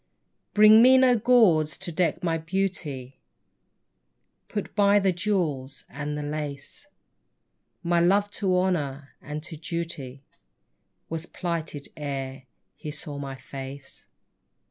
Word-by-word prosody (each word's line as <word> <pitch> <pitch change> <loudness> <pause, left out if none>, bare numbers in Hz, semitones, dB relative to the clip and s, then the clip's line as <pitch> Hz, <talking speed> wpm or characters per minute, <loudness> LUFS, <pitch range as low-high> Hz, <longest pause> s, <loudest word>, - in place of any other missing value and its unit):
Bring 215 +1 +8
me 260 +2 +8
no 255 -1 +5
gauds 210 -10 +4
to 185 -2 -5
deck 170 +2 0
my 165 -2 0
beauty, 160 -7 -3 1.3
Put 205 - -5
by 205 -1 +5
the 195 -2 +3
jewels 165 -8 -2
and 150 +1 -4
the 150 - -4
lace; 145 - -5 1.0
My 170 0 +2
love 200 +4 +3
to 190 -3 0
honour 150 -7 -1
and 150 +1 -6
to 165 -1 -8
duty 155 -4 -5 0.8
Was 165 +1 -4
plighted 165 -5 -4
ere 135 -2 -5 0.3
he 155 - -7
saw 145 -1 -6
my 135 -1 -5
face. 135 +1 -9
165 Hz, 120 wpm, -26 LUFS, 145-190 Hz, 1.3 s, Bring